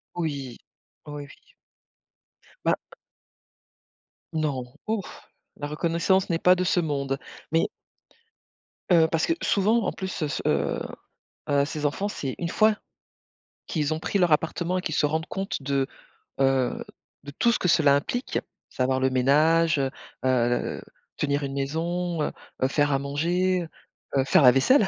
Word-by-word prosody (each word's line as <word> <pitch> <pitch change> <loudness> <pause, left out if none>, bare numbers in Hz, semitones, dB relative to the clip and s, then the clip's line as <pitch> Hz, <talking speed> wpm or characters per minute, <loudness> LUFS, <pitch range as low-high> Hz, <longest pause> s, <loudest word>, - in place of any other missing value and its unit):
Oui, 140 -7 -3 0.5
oui. 145 -1 -6 1.4
Ben - - +4 1.6
Non. 150 -5 -1 0.2
Ouf. 215 -3 -4 0.3
La 145 - -4
reconnaissance 170 +5 +1
n'est 165 - +2
pas 180 +1 +6
de 185 - 0
ce 180 - +2
monde. 140 -4 -1 0.3
Mais 165 - +2 1.2
heu, 165 -2 +6
parce 165 0 +2
que 330 - +3
souvent 215 +3 +2
en - - 0
plus, 190 -4 -4
heu, - - +2
s 145 - -3
heu, 70 0 +1 0.7
heu, 140 -1 +3
ces 150 0 -5
enfants, 195 +8 -1
c'est 135 -9 -4
une 170 - -2
fois 215 +3 +3 0.9
qu'ils 155 -1 0
ont 155 - -5
pris 200 - -1
leur 175 -4 +3
appartement 170 +4 +1
et - - -1
qu'ils 160 - -2
se 150 - +3
rendent 160 +2 -1
compte 195 -5 -4
de, 135 0 0 0.5
heu, 135 -2 +2 0.4
de 145 - -8
tout 235 - +4
ce - - +1
que - - 0
cela 155 -5 +5
implique, 245 - -2 0.3
savoir 130 +1 0
le 130 0 +2
ménage, 155 +5 +3
heu, 135 - +1 0.4
heu, 120 -2 +1 0.4
tenir 145 0 0
une 135 -1 -3
maison, 165 +5 -2
heu, - - -1 0.3
heu, 130 - +4
faire 145 +1 +2
à 135 - +2
manger, 175 +6 0 0.5
heu, 135 - +4
faire 140 - +5
la 125 - +9
vaisselle, 195 - +4
155 Hz, 150 wpm, -26 LUFS, 140-175 Hz, 1.6 s, la